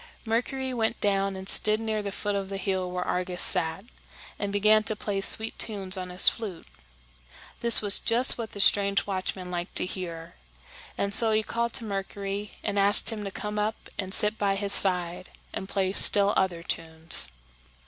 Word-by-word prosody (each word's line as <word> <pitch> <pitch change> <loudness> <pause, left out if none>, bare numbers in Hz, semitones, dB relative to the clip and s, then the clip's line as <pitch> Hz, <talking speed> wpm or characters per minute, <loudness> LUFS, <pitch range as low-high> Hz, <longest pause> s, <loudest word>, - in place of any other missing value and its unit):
Mercury 255 +3 -3
went 225 -1 -2
down 195 -1 -1
and 190 0 -9
stood 215 +2 +3
near 220 -1 -3
the 200 -1 -6
foot 205 +1 -4
of 195 -1 -4
the 195 - -6
hill 190 -2 -3
where 180 0 -5
Argus 180 0 -3
sat, 160 +5 -1 0.5
and 205 -1 -4
began 215 +2 +2
to 220 - 0
play 205 -2 -4
sweet 220 +3 -3
tunes 200 -3 -2
on 185 -1 -7
his 180 +1 0
flute. 205 -7 -2 0.9
This 235 -2 +6
was 205 -1 +6
just 240 +3 +8
what 230 -3 -5
the 200 - -10
strange 200 0 +4
watchman 185 -2 -5
liked 175 +1 -6
to - - +3
hear; 170 -3 -8 0.6
and 200 0 -2
so 225 +1 +2
he 215 0 0
called 235 +1 -4
to - - -1
Mercury, 200 0 -6
and 205 -1 -2
asked 200 +3 +5
him 215 -2 -6
to - - -4
come 210 +2 -6
up 215 +2 -2 0.2
and 190 -1 -4
sit 210 +2 0
by 200 -1 0
his 200 0 -2
side 180 -2 0 0.2
and 190 - -7
play 190 -1 -2
still 200 0 +5
other 175 -3 -1
tunes. 160 - -3
200 Hz, 185 wpm, -25 LUFS, 185-215 Hz, 0.9 s, just